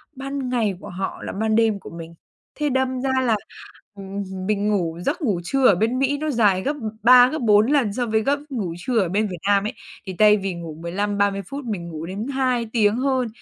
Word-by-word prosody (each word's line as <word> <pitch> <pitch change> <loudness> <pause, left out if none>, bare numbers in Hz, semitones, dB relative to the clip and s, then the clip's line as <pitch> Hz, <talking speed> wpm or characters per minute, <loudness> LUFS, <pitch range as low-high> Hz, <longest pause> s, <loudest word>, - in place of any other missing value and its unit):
ban 275 -1 -4
ngày 225 -6 0
của - - -10
họ 190 +2 -5
là - - -4
ban 220 +2 0
đêm 220 -3 +2
của - - -11
mình, 165 0 -9 0.4
thế 300 -1 -1
đâm 260 -1 0
ra 270 - -1 0.2
là, 225 -3 +3 0.6
ừm, 195 0 -6 0.2
mình 210 0 0
ngủ 175 -6 -1
giấc 320 +5 -1
ngủ 205 - 0
trưa 270 +6 +2
ở 200 - +6
bên 230 +7 0
Mỹ 275 +1 +1
nó 310 +1 -2
dài 210 -7 +3
gấp 290 +2 -1 0.3
3 245 +1 +8
gấp 315 - -3
4 215 -1 +4
lần 245 -9 +2
so 245 +1 -1
với 220 0 +1
gấp 285 +1 +1
ngủ 200 -11 -3
trưa 225 +6 0
ở 185 -4 +1
bên 210 +3 +1
Việt 180 -3 -6
Nam 200 -1 +3
ấy, - - -3 0.3
thì 190 -2 -6
thay 210 0 +6
vì 195 -2 -3
ngủ 165 -2 -7
15-30 200 +3 -1
phút 280 -1 -6
mình 185 -7 -4
ngủ 160 -1 -6
đến 200 +6 -5
2 255 -4 0
tiếng 210 -2 +3
hơn. 260 -1 0
215 Hz, 230 wpm, -22 LUFS, 195-255 Hz, 0.6 s, 3